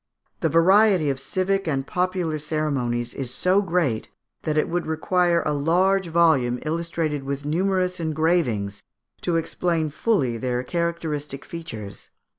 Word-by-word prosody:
The - - +1
variety 185 -2 +5
of 135 - -4
civic 190 +6 -1
and 135 -3 0
popular 180 -3 -1
ceremonies 135 -6 -1
is 135 -3 -4
so 185 +9 +2
great, 165 - 0 0.3
that 155 -1 -1
it 155 - +2
would 175 0 -2
require 170 +2 +2
a 150 - +1
large 180 +6 +2
volume, 160 -8 +3
illustrated 160 -2 -2
with 140 +1 -4
numerous 180 +3 0
engravings, 155 - 0 0.4
to 175 - 0
explain 165 -1 0
fully 140 - +1
their 125 0 -1
characteristic 155 -3 -3
features. 115 - -7
160 Hz, 130 wpm, -24 LUFS, 140-175 Hz, 0.4 s, variety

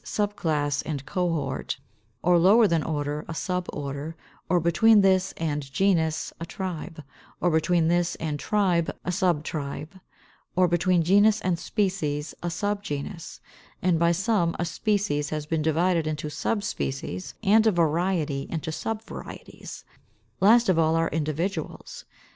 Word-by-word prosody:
Subclass 155 -9 -1
and 145 -3 -4
Cohort; 175 -4 -2 0.5
or 175 0 +5
lower 205 +7 +6
than 165 -4 +1
order, 145 -1 -2
a - - -5
Suborder; 160 -4 -4 0.3
or 180 - +4
between 205 +6 +5
this 190 -1 +3
and 145 -4 -3
genus, 160 -2 +1
a 165 - -4
Tribe; 175 -5 -6 0.4
or 175 - +2
between 160 +1 +2
this 175 +1 +1
and 155 -2 -3
tribe, 185 -5 +1 0.2
a 180 - 0
Subtribe; 160 -2 -2 0.6
or 185 0 +4
between 175 0 +2
genus 205 +5 +4
and 180 -4 0
species, 165 -7 -1
a 175 - -3
Subgenus; 190 -3 -4 0.4
and 175 -3 +2
by 170 0 +4
some 175 -1 +1
a 175 - -1
species 175 -4 -1
has 155 -1 -3
been 160 +1 -1
divided 165 +1 +1
into 155 0 -3
Subspecies, 135 - -3
and 220 +2 +5
a - - +5
variety 165 -4 0
into 160 -1 -3
Subvarieties. 220 +7 -7 0.6
Last 230 +4 +5
of 180 -3 +3
all 160 0 +3
are 165 0 +1
Individuals. 160 +3 -3
170 Hz, 135 wpm, -26 LUFS, 155-190 Hz, 0.6 s, lower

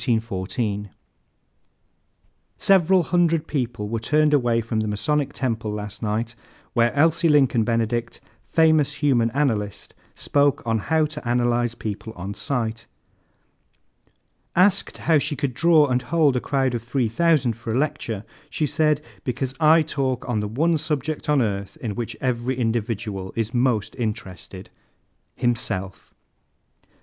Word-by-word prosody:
_ 105 -2 -2 1.7
"Several 190 -3 +4
hundred 165 -2 +2
people 120 -7 -3
were 115 +2 -2
turned 150 +6 +2
away 120 -5 +3
from 115 -1 -2
the 110 - -1
Masonic 140 +7 0
Temple 115 -6 -2
last 105 -1 -6
night 110 +1 -2 0.4
where 120 -1 +3
Elsie 165 +3 +3
Lincoln 135 -6 +4
Benedict, 115 +1 -1 0.3
famous 155 -3 +3
human 135 -6 +2
analyst, 115 -7 -2 0.2
spoke 145 -3 +1
on 115 -1 +1
'How 155 +8 +1
to 150 -5 -7
Analyze 120 -1 +1
People 110 +1 -6
on 95 +3 -5
Sight.' 115 -1 -3 1.7
Asked 185 +2 +3
how 160 -3 +5
she 145 - -1
could 140 -2 -2
draw 160 +3 +5
and 125 -2 0
hold 155 -4 +2
a 125 - 0
crowd 135 -3 0
of 120 - -2
3,000 130 +3 +1
for 115 0 -6
a 115 - 0
lecture, 135 -8 -2 0.3
she 155 - -1
said: 150 +1 +1 0.2
'Because 130 +1 -2
I 160 +1 +6
talk 135 -4 -2
on 120 -4 0
the 105 - -2
one 155 +9 +1
subject 150 0 -2
on 145 -4 +4
earth 100 -2 -3
in 110 -4 -3
which 120 +1 -5
every 125 0 -1
individual 110 -5 -2
is 115 +1 -2
most 120 -4 +1
interested 100 -5 -6 0.6
himself.'" 105 -6 -2
120 Hz, 135 wpm, -23 LUFS, 110-150 Hz, 1.7 s, I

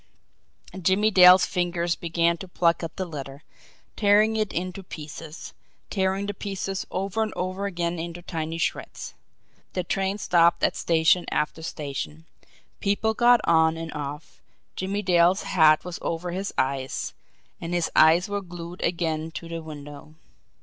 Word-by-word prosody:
Jimmie 195 +5 +3
Dale's 180 -1 +8
fingers 175 -2 -1
began 170 0 +1
to 190 - -8
pluck 170 -1 +1
at 165 -1 -6
the 185 - -2
letter, 140 -3 -8 0.5
tearing 210 +1 +4
it 215 -2 0
into 185 +2 -4
pieces, 155 -2 -9 0.4
tearing 190 0 0
the 205 - -3
pieces 195 -1 -4
over 195 +3 -2
and 220 -1 0
over 185 +2 -2
again 170 -2 -2
into 170 +1 -6
tiny 165 -2 -4
shreds. - - -3 0.6
The 180 - -1
train 195 +2 -1
stopped 170 -4 +3
at - - +2
station 165 +1 +2
after 150 +2 -1
station, 135 - -5 0.5
people 205 +2 +1
got 240 0 +5
on 160 -1 +3
and 165 -1 -6
off 145 +1 -7 0.3
Jimmie 195 +2 -2
Dale's 180 +1 +3
hat 155 -4 +4
was 180 -1 -6
over 170 +1 -3
his 195 +3 -3
eyes, 135 0 -1 0.5
and 170 - -5
his 175 -2 0
eyes 165 +3 +6
were 205 0 -2
glued 175 -1 -9
again 165 -2 -1
to 170 - -7
the 165 0 -5
window. 145 -1 -10
175 Hz, 150 wpm, -25 LUFS, 160-190 Hz, 0.6 s, Dale's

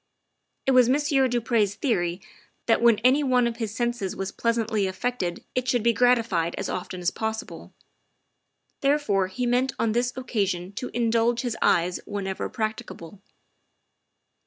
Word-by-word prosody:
It 270 - +3
was 250 -2 +5
Monsieur 275 -1 +2
du 245 -1 0
Pre's 215 -4 +1
theory 180 - -1 0.4
that 225 - +3
when 235 -2 +5
any 260 +4 +5
one 250 -3 +3
of 235 -1 -2
his 225 -3 -3
senses 240 -5 -2
was 195 0 -4
pleasantly 225 -3 0
affected 190 -2 -3
it 255 0 -1
should 240 -2 +1
be 235 0 +4
gratified 230 -9 +2
as - - -3
often 180 0 -5
as 175 - +1
possible; 220 0 -5 1.1
therefore 275 -10 +1
he 245 +7 -3
meant 250 +2 +1
on 230 - +1
this 240 +2 0
occasion 195 -8 -2
to 250 +5 -5
indulge 235 0 +2
his 240 -3 -2
eyes 175 +1 +2
whenever 195 -2 -3
prac 215 -1 -2
ticable. 170 +4 -10
230 Hz, 155 wpm, -25 LUFS, 195-245 Hz, 1.1 s, was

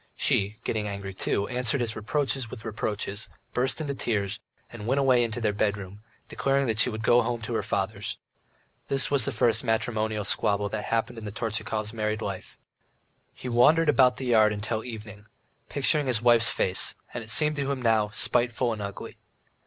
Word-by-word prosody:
She, 100 +2 +1
getting 105 -1 -2
angry 100 -1 -5
too, 100 +1 -1
answered 125 +1 0
his 115 -2 -2
reproaches 135 +2 -1
with 115 0 -10
reproaches, 105 -1 -3 0.2
burst 130 +4 0
into 145 -3 -2
tears, 100 -7 -2 0.3
and 105 - -8
went 130 +3 +1
away 130 -3 +4
into 115 +1 -3
their 110 -3 0
bedroom, 100 -1 -2 0.3
declaring 135 -4 0
she 115 +3 +3
would 110 -1 -5
go 120 +2 +5
home 120 0 -2
to 115 - -4
her - - +1
father's. 100 +1 -2 0.7
This 135 0 +1
was 140 -5 +4
the - - 0
first 115 0 +2
matrimonial 110 -2 -1
squabble 100 -1 0
that 105 0 -4
had - - -7
happened 115 +1 -1
in 110 - -9
the 105 - -5
Tortchakov's 110 0 -3
married 110 0 -2
life. 95 -2 -6 0.8
He - - -8
walked 125 +6 +5
about 130 -4 +4
the 130 - -5
yard 110 -3 +4
till 110 0 -1
the 120 - -8
evening, 105 -2 -9 0.4
picturing 145 +1 +2
his 125 -4 +3
wife's 120 0 +4
face, 90 - +2 0.2
and 120 - -4
it 110 - -9
seemed 150 +5 +5
to 140 -1 -1
him 135 - -2
now 110 -2 +3
spiteful 120 +2 +1
and 105 - -6
ugly. 100 -1 -7
115 Hz, 185 wpm, -27 LUFS, 105-125 Hz, 0.8 s, go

